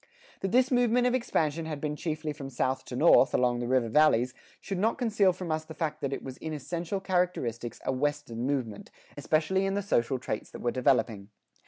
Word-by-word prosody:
That 195 - -2
this 255 +1 +3
movement 245 0 +3
of 250 - +2
expansion 165 - 0
had 155 -2 -4
been 150 0 -2
chiefly 155 -1 -3
from 135 -2 -7
south 130 +1 -1
to 125 - -7
north, 140 -1 +5
along 125 -1 +2
the 120 - -3
river 125 -2 +2
valleys, 125 -2 +3 0.3
should 195 -3 -4
not 225 +4 +1
conceal 215 -6 +3
from 180 -2 -5
us 155 0 -1
the 160 0 -11
fact 155 -1 -3
that 140 - -2
it 135 - -4
was 130 -1 -7
in 160 -1 -5
essential 170 +6 -3
characteristics 175 - -1
a - - +1
Western 135 -3 -2
movement, 125 -7 -3 0.3
especially 155 +6 +1
in 195 0 0
the 200 - -1
social 130 -8 +1
traits 110 -3 -4
that - - -10
were 120 - 0
developing. 115 -5 +1
150 Hz, 205 wpm, -29 LUFS, 130-185 Hz, 0.3 s, north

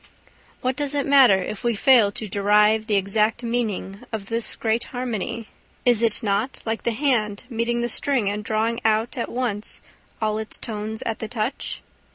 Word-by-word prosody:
What 255 0 0
does 290 +1 -2
it 280 - 0
matter 270 -7 +7
if 215 - -6
we 235 -1 +1
fail 235 -3 +5
to 215 - -4
derive 210 +2 +3
the 210 - +2
exact 210 +4 +1
meaning 220 -5 -2
of 215 -3 -5
this 230 0 -1
great 225 +1 0
harmony? 230 -3 -4 0.4
Is 240 -3 +4
it 230 -1 +2
not 210 +5 -1
like 225 0 -1
the 235 - 0
hand 220 -5 0
meeting 235 +1 0
the 240 - 0
string 245 -2 +2
and 205 +1 -2
drawing 220 +2 0
out 220 +4 +1
at 240 - -3
once 235 -4 -3 0.4
all 215 -1 0
its 220 - -1
tones 220 0 -5
at 225 - -3
the 220 - -4
touch? 230 +4 -4
220 Hz, 180 wpm, -23 LUFS, 210-240 Hz, 0.4 s, matter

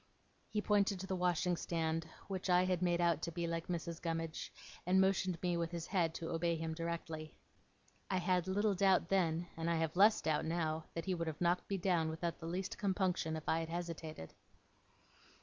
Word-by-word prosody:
He 210 -1 -1
pointed 200 -2 +2
to 190 - -4
the 190 - -2
washing 180 0 +1
stand, 165 -1 -1 0.2
which 190 -1 -3
I 180 0 +5
had 185 -1 0
made 175 -1 +2
out 170 -3 +2
to 170 - -3
be 170 +1 -2
like 165 0 -2
Mrs. 170 -1 -3
Gummidge, 165 -1 -3 0.3
and 185 +2 +3
motioned 190 -2 +2
me 175 -1 +1
with 170 -1 -1
his 170 -1 -4
head 170 -4 +1
to 165 - -4
obey 170 0 +1
him 160 0 -3
directly. 165 -2 -4 0.7
I 190 - +1
had 180 -1 +1
little 205 +2 +2
doubt 190 -3 +3
then, 175 -3 +2
and 165 +1 -2
I 170 - +2
have 160 0 0
less 210 +4 +6
doubt 155 -1 0
now, 160 -1 -1
that 165 - -3
he 190 - 0
would 170 -2 -2
have 155 -1 -4
knocked 175 +1 +1
me 200 - 0
down 175 -3 +1
without 165 +1 -3
the 165 - -6
least 185 +2 -3
compunction, 185 -5 0
if 155 - -7
I 160 - +2
had 165 0 -4
hesitated. 165 - -5
170 Hz, 200 wpm, -36 LUFS, 165-185 Hz, 0.7 s, less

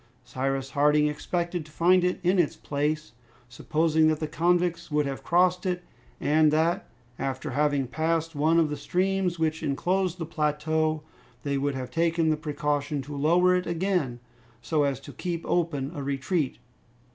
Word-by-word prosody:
Cyrus 135 +2 -2
Harding 150 +1 +3
expected 170 +3 -2
to 155 - -17
find 180 +3 +4
it 180 0 0
in 180 +2 +3
its 170 - +2
place; 150 +2 -2 0.4
supposing 155 +5 +1
that 155 -1 +1
the 155 - -2
convicts 175 +1 +1
would 150 -1 +1
have 135 -1 -4
crossed 180 +1 +3
it, 180 -1 -2 0.4
and 155 +1 +4
that, 165 +4 +1 0.3
after 135 -1 -3
having 145 0 +1
passed 160 +5 -1
one 155 +3 +2
of 155 -3 +2
the 150 - -3
streams 185 +3 0
which 160 -1 0
enclosed 180 +5 0
the 165 - -4
plateau, 155 0 0 0.4
they 140 -1 -1
would 140 0 -1
have 130 -1 -5
taken 165 -1 +2
the - - +2
precaution 150 -1 -2
to 145 +2 -8
lower 175 +6 +4
it 180 -1 -1
again, 170 -7 -1 0.4
so 150 +4 +1
as 140 -2 -1
to - - -11
keep 170 -2 -4
open 155 -6 0
a 145 - -5
retreat. 140 +2 -1
155 Hz, 165 wpm, -27 LUFS, 145-170 Hz, 0.4 s, find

